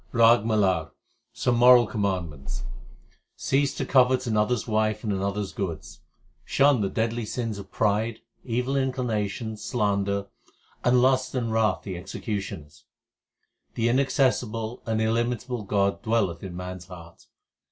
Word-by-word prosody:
RAG 115 -1 +6
MALAR 95 -7 +1 0.4
Some 120 -1 0
moral 125 0 +7
commandments: 90 -10 -3 0.7
Cease 140 0 +1
to - - -2
covet 130 -1 +3
another 110 +1 +2
s - - -5
wife 110 -1 0
and 105 -3 -1
another 100 +1 -1
s 95 - -5
goods; 80 -6 -5 0.4
shun 140 - +3
the 100 - 0
deadly 115 +2 -1
sins 110 -1 -3
of 100 - -11
pride, 110 +2 0 0.3
Evil 125 +2 -1
inclinations, 115 -5 -2
slander, 100 -3 0 0.6
and 125 0 +4
lust 130 0 +2
and 115 -3 -1
wrath 110 -1 +1
the 95 - -5
execu 95 +4 -4
tioners. 75 -6 -8 0.9
The 115 +1 +1
inaccessible 125 -3 0
and 110 -1 0
illimitable 120 +2 -1
God 100 0 +1
dwelleth 110 -7 0
in 90 -3 -7
man 90 0 -5
s 90 - -13
heart. 85 -3 -13
110 Hz, 140 wpm, -26 LUFS, 100-125 Hz, 0.9 s, moral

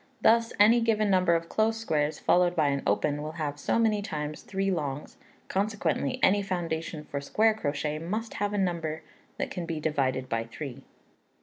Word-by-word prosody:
Thus, 230 0 +4
any 225 +3 +6
given 215 -3 +2
number 185 -2 +4
of 165 0 -2
close 220 +3 +1
squares, 155 -9 0
followed 180 0 +3
by 145 - +3
an 140 -1 0
open, 145 +8 +1
will 155 +1 -5
have 150 -3 -4
so - - 0
many 220 -2 +2
times 150 -5 -4
three 195 0 -1
L's; 145 -3 -4 0.3
consequently 190 -8 -1
any 205 +2 +5
foundation 165 -5 -3
for 140 -1 -4
square 220 +9 +3
crochet 150 -5 -2
must 215 +7 -3
have 205 0 +1
a 205 - -2
number 170 -5 -1 0.3
that - - -3
can 175 -3 -4
be 165 -2 -3
divided 135 -4 0
by 115 -1 -1
three. 125 +3 -7
165 Hz, 180 wpm, -28 LUFS, 150-205 Hz, 0.3 s, any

